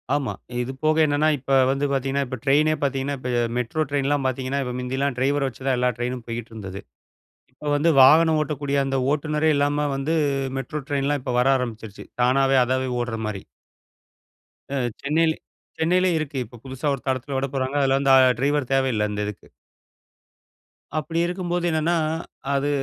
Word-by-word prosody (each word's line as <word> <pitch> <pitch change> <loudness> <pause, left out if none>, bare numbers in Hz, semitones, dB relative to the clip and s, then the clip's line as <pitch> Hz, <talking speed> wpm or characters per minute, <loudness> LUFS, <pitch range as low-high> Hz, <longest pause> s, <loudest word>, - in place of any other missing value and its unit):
ஆமா. 145 -3 -1 0.3
இது 125 +2 -3
போக 155 0 +3
என்னன்னா 145 +1 +2
இப்ப 135 +1 -7 0.2
வந்து 140 +1 0
பாத்தீங்கன்னா, 135 +1 0
இப்ப 130 - -5
ட்ரெய்னே 150 +3 +4
பாத்தீங்கன்னா, 135 0 -1
இப்ப 125 - -5 0.3
மெட்ரோ 125 +6 -1
ட்ரெயின்லாம் 140 -1 0
பாத்தீங்கன்னா, 130 +2 -2
இப்ப 125 -1 -4
முந்தியெல்லாம் 130 +2 -1
டிரைவர 140 +1 +1
வச்சு 130 +1 -12
தான் 130 -2 +2
எல்லா 125 0 +2
ட்ரெயினும் 125 0 -3
போய்க்கிட்டுருந்தது. 110 -4 -7 0.7
இப்ப 145 +3 -5
வந்து 160 +3 +3
வாகனம் 160 +4 +6
ஓட்டக்கூடிய 145 -1 -2
அந்த 135 0 -1 0.2
ஓட்டுனரே 150 +1 +1
இல்லாம 145 +1 +1
வந்து 140 +4 -1 0.4
மெட்ரோ 150 +3 -4
ட்ரெயின்லாம் 145 0 0
இப்ப 125 -1 -3
வர 125 - +2
ஆரம்பிச்சிருச்சு.தானாவே 125 +3 0
அதாவே 130 +1 0
ஓடுற 120 -2 -3
மாரி. 105 -3 -5 1.3
அ - - -2 0.3
சென்னையில 160 +3 +2 0.5
சென்னையிலேயே 180 +2 +2
இருக்கு. 145 -3 -4
இப்ப 120 +2 -14
புதுசா 130 +2 -4
ஒரு 135 - -5
தடத்துல 130 +1 -2
விடப்போறாங்க. 135 0 -2
அதுல 135 0 +3
அந்த 135 -1 +3 0.3
ட்ரைவர் 145 -1 0
தேவையில்ல, 130 -6 +1
அந்த 105 0 -3
இதுக்கு. 105 -1 -8 1.5
அப்படி 165 +2 -2
இருக்கும்போது 175 -1 -2
என்னன்னா, 160 +1 +1 0.6
அது 140 +1 0
135 Hz, 150 wpm, -23 LUFS, 125-150 Hz, 1.5 s, வாகனம்